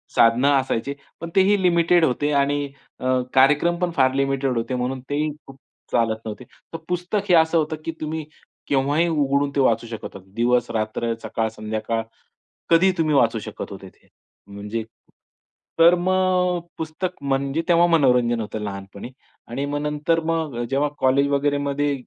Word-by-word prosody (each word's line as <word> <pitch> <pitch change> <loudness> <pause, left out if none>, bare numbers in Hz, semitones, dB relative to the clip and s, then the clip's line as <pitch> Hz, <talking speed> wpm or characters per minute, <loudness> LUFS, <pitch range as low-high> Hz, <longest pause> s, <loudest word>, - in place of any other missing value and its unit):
साधनं 115 +4 +4
असायचे. 135 -1 0 0.3
पण 170 - -6
तेही 195 +1 +4
लिमिटेड 170 -1 +4
होते 145 +3 0
आणि 145 +1 +1 0.3
अ, - - -6 0.3
कार्यक्रमपण 170 +6 +3
फार 130 -1 +3
लिमिटेड 135 -1 0
होते. 115 +3 -2
म्हणून 125 +1 -2
तेही 150 +2 0 0.2
खूप 135 - -13 0.3
चालत 115 -1 +1
नव्हते. 105 -2 -6 0.3
तर - - -3
पुस्तक 180 +3 -2
हे - - +5
असं 160 0 +4
होतं, 155 0 0
की - - -2
तुम्ही 155 0 -3 0.4
केव्हाही 145 +5 +2
उघडून 145 -3 +1
ते - - +1
वाचू 115 -2 +2
शकत 115 -2 -7
होता. - - -7 0.2
दिवस, 120 0 +2
रात्र, 110 +1 -2
सकाळ, 115 - -1
संध्याकाळ 110 +1 -3 0.7
कधीही 170 +3 +5
तुम्ही 155 -2 +1
वाचू 115 -4 +3
शकत 110 0 -7
होते 95 -1 -9
ते - - -30 0.4
म्हणजे 105 +3 -5 1.0
तर 170 +2 +7
मग 180 0 +1 0.2
पुस्तक 160 +3 -4
म्हणजे 140 +3 0
तेव्हा 175 0 +5
मनोरंजन 125 -7 +3
होतं 110 0 -5
लहानपणी. 100 +3 -7 0.4
आणि 135 +4 -3
मग 145 +1 -2
नंतर 150 +2 0
मग 160 -5 -1
जेव्हा 140 +2 +1
कॉलेज 135 +2 +3
वगैरेमध्ये 145 0 0
140 Hz, 150 wpm, -22 LUFS, 120-165 Hz, 1.0 s, तर